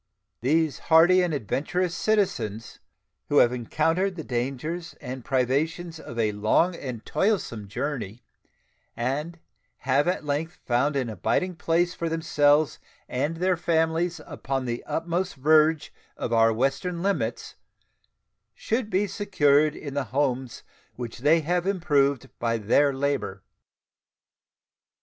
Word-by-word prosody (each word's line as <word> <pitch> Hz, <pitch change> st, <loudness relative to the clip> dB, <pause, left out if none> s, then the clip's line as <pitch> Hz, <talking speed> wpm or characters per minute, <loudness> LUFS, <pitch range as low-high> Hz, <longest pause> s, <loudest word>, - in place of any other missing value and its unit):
These 155 Hz, +4 st, +1 dB
hardy 170 Hz, +3 st, +6 dB
and 175 Hz, -2 st, 0 dB
adventurous 155 Hz, -, -1 dB
citizens, 120 Hz, -, -1 dB, 0.5 s
who 145 Hz, -, +2 dB
have 120 Hz, -2 st, +5 dB
encountered 165 Hz, -, 0 dB
the 160 Hz, -, -6 dB
dangers 135 Hz, +8 st, -3 dB
and 130 Hz, 0 st, -7 dB
privations 155 Hz, +7 st, -1 dB
of 120 Hz, -, -9 dB
a 110 Hz, -2 st, +1 dB
long 110 Hz, -, +2 dB
and 125 Hz, -8 st, -7 dB
toilsome 155 Hz, -, -1 dB
journey, 115 Hz, -1 st, -4 dB, 0.7 s
and 145 Hz, +8 st, -2 dB, 0.4 s
have 135 Hz, +4 st, +2 dB
at 180 Hz, -3 st, -1 dB
length 150 Hz, +4 st, -2 dB
found 130 Hz, +5 st, +1 dB
an 130 Hz, -3 st, 0 dB
abiding 145 Hz, -, -1 dB
place 170 Hz, +2 st, +1 dB
for 170 Hz, -2 st, -3 dB
themselves 150 Hz, -2 st, +2 dB, 0.3 s
and 145 Hz, +6 st, -2 dB
their 185 Hz, +1 st, +2 dB
families 165 Hz, +1 st, 0 dB
upon 135 Hz, -4 st, -3 dB
the 120 Hz, -1 st, -3 dB
utmost 175 Hz, +3 st, -2 dB
verge 155 Hz, +2 st, +3 dB, 0.2 s
of 120 Hz, -, -3 dB
our 115 Hz, 0 st, +5 dB
western 135 Hz, +9 st, -1 dB
limits, 200 Hz, 0 st, -2 dB, 1.0 s
should 225 Hz, -1 st, -2 dB
be 200 Hz, 0 st, +1 dB
secured 155 Hz, -8 st, +2 dB
in 140 Hz, -2 st, -7 dB
the 140 Hz, -1 st, -1 dB
homes 130 Hz, 0 st, -2 dB, 0.3 s
which 120 Hz, -2 st, -7 dB
they 155 Hz, +5 st, +4 dB
have 175 Hz, +3 st, -1 dB
improved 145 Hz, -8 st, +1 dB
by 115 Hz, -1 st, 0 dB
their 130 Hz, +7 st, +3 dB
labor. 135 Hz, -8 st, -2 dB
145 Hz, 125 wpm, -26 LUFS, 125-170 Hz, 1.0 s, hardy